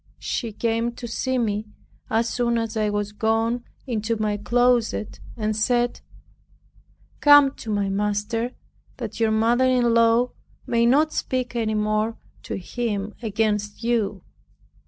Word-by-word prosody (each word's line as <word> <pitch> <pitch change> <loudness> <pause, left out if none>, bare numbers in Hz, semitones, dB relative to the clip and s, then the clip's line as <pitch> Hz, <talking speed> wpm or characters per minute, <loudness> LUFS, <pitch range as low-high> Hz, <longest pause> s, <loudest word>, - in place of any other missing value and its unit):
She 230 -3 -3
came 230 +2 -1
to 240 - -7
see 260 +3 -1
me 215 -2 -1 0.4
as 225 +1 +1
soon 235 0 0
as 225 0 -2
I 215 -1 +1
was 205 0 -2
gone 225 +3 0 0.2
into 230 -2 -1
my 210 -1 0
closet, 220 - +1 0.2
and 215 -1 -1
said, 240 +2 +1 1.2
"Come 290 -2 +7
to 225 - -8
my 205 -2 0
master 210 +4 -1 0.4
that 230 -3 -6
your 225 -1 +3
mother 230 +4 +3
in 245 -2 +3
law 230 +2 +4 0.3
may 235 0 +2
not 300 +5 +3
speak 255 -1 -2
any 220 -2 0
more 215 +1 0 0.2
to - - -5
him 210 +1 -3
against 210 -1 -1
you." 215 -5 0
225 Hz, 135 wpm, -24 LUFS, 210-240 Hz, 1.2 s, Come